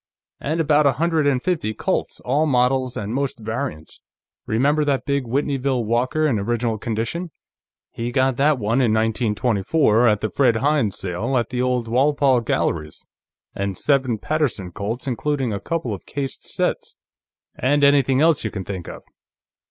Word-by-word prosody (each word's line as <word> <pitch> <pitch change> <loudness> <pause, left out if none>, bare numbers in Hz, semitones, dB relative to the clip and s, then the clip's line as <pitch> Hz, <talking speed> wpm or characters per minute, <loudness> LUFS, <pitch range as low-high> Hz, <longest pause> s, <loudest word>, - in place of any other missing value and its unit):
And 155 +4 -2
about 150 -2 +4
a 135 - +3
hundred 160 +1 +1
and 130 -3 +1
fifty 155 -12 -1
Colts, - - -2
all 145 +5 +1
models 130 -1 +1
and 105 +1 -4
most 135 -1 -2
variants. 110 - -5 0.5
Remember 140 +7 +2
that 140 -2 0
big 140 -2 0
Whitneyville 135 -1 -1
Walker, 125 +7 +1
in 125 -8 +1
original 115 +1 -1
condition? 115 - -3 0.6
He 120 +1 -4
got 130 0 +2
that 145 +1 +3
one 115 +3 +1
in 120 -4 +3
1924, 110 +2 +2
at 105 -2 +2
the 110 - -2
Fred 125 -5 +3
Hines 135 -4 +1
sale, 105 +8 -2
at 120 - 0
the 125 -1 -2
old 125 -2 0
Walpole 135 +1 +3
Galleries. 75 -8 -2 0.5
And 100 -2 -3
seven 135 -5 +1
Paterson 130 - -2
Colts, 110 +8 -4
including 135 -1 -1
a 100 - -3
couple 165 -7 -3
of 100 - -9
cased 135 -2 -4
sets. - - -2 0.6
And 145 +3 +1
anything 140 -1 +4
else 160 -2 +3
you 110 - -1
can 95 -3 -6
think 95 -4 -6
of. - - -9
125 Hz, 160 wpm, -22 LUFS, 110-140 Hz, 0.6 s, about